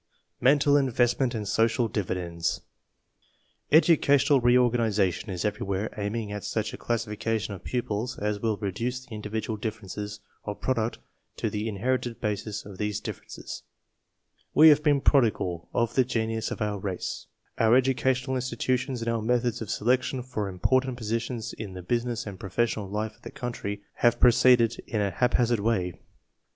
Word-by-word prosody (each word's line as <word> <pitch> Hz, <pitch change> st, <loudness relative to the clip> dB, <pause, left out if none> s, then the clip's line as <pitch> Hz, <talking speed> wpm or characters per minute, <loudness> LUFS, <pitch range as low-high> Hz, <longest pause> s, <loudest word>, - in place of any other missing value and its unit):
MENTAL 145 Hz, +2 st, +5 dB
INVESTMENT 125 Hz, -1 st, +2 dB
AND 105 Hz, -2 st, -3 dB
SOCIAL 115 Hz, +3 st, +2 dB
DIVIDENDS 90 Hz, -5 st, -2 dB, 1.1 s
Educational 145 Hz, -3 st, +5 dB
reorganization 115 Hz, -6 st, +2 dB
is 90 Hz, -1 st, -3 dB
everywhere 105 Hz, 0 st, -2 dB
aiming 105 Hz, +1 st, -3 dB
at 105 Hz, -1 st, -5 dB
such 110 Hz, -1 st, -2 dB
a -, -, -6 dB
classification 115 Hz, -2 st, -2 dB
of 95 Hz, -, -9 dB
pupils 120 Hz, -1 st, -2 dB
as 105 Hz, 0 st, -1 dB
will 110 Hz, -1 st, 0 dB
reduce 115 Hz, +6 st, -3 dB
the 115 Hz, -, -9 dB
individ 105 Hz, +1 st, -4 dB
ual 110 Hz, -2 st, -4 dB
differences 105 Hz, -2 st, -5 dB, 0.2 s
of 105 Hz, -1 st, -5 dB
product 115 Hz, -3 st, -1 dB, 0.4 s
to -, -, -1 dB
the 105 Hz, +2 st, -2 dB
inherited 120 Hz, +3 st, -1 dB
bases 105 Hz, -1 st, -3 dB
of 100 Hz, -2 st, -10 dB
these 105 Hz, 0 st, -1 dB
differences. -, -, -7 dB, 0.9 s
We 160 Hz, +1 st, +9 dB
have 150 Hz, 0 st, +6 dB
been 145 Hz, -2 st, +3 dB
prodigal 105 Hz, -, +2 dB
of 115 Hz, -2 st, 0 dB
the 130 Hz, -, +4 dB
genius 115 Hz, -2 st, -1 dB
of -, -, -3 dB
our 105 Hz, -1 st, -2 dB
race. 95 Hz, -2 st, -4 dB, 0.3 s
Our 115 Hz, +1 st, +5 dB
educational 130 Hz, 0 st, +2 dB
institutions 125 Hz, 0 st, -1 dB
and -, -, -6 dB
our 115 Hz, -1 st, -1 dB
methods 120 Hz, +1 st, 0 dB
of 110 Hz, -, -5 dB
selection 130 Hz, +3 st, 0 dB
for 110 Hz, -6 st, -3 dB
important 130 Hz, +7 st, +1 dB
positions 115 Hz, +1 st, -3 dB
in 105 Hz, -4 st, -7 dB
the 90 Hz, -1 st, -8 dB
business 120 Hz, +3 st, -1 dB
and 100 Hz, -3 st, -7 dB
professional 105 Hz, +1 st, -1 dB
life 105 Hz, +1 st, -3 dB
of -, -, -31 dB
the -, -, -8 dB
country 105 Hz, -4 st, -5 dB
have 120 Hz, 0 st, +3 dB
proceeded 120 Hz, -1 st, +5 dB
in 110 Hz, -, -1 dB
a 100 Hz, -1 st, +1 dB
hap 125 Hz, +7 st, +1 dB
hazard 120 Hz, -2 st, +2 dB
way. 100 Hz, -5 st, 0 dB
115 Hz, 155 wpm, -27 LUFS, 105-125 Hz, 1.1 s, We